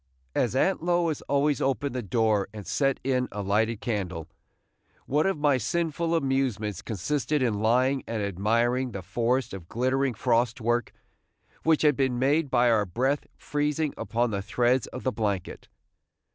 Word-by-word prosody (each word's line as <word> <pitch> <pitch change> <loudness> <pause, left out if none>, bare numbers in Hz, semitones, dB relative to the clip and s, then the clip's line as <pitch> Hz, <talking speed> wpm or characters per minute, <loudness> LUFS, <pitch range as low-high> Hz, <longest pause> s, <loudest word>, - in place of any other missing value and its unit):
As 125 0 0
Aunt 190 +7 +2
Lois 170 -2 +1
always 145 +1 +2
opened 135 0 0
the 125 - -2
door 105 -1 +1
and 105 -2 -7
set 135 -2 0
in 125 -1 +1
a 105 0 -4
lighted 110 +3 +1
candle, 95 - -3 0.8
one 150 +6 +1
of 195 - 0
my 145 -3 +2
sinful 170 - -1
amusements 130 - -1
consisted 130 - -1
in 110 -5 0
lying 130 +4 +2
and 110 -2 -2
admiring 115 +6 0
the 100 - -5
forest 120 +5 0
of 90 -4 -8
glittering 130 +1 0
frost 120 +1 +1
work 120 +1 0 0.7
which 160 -1 +2
had 150 -2 +5
been 130 -2 0
made 140 +4 +2
by 125 -1 +3
our 105 -3 +2
breath 130 +10 0
freezing 150 +1 -1
upon 120 0 -1
the 100 -1 -2
threads 120 +5 +1
of 125 - -8
the 130 - +1
blanket. 105 -5 -3
125 Hz, 160 wpm, -27 LUFS, 110-140 Hz, 0.8 s, had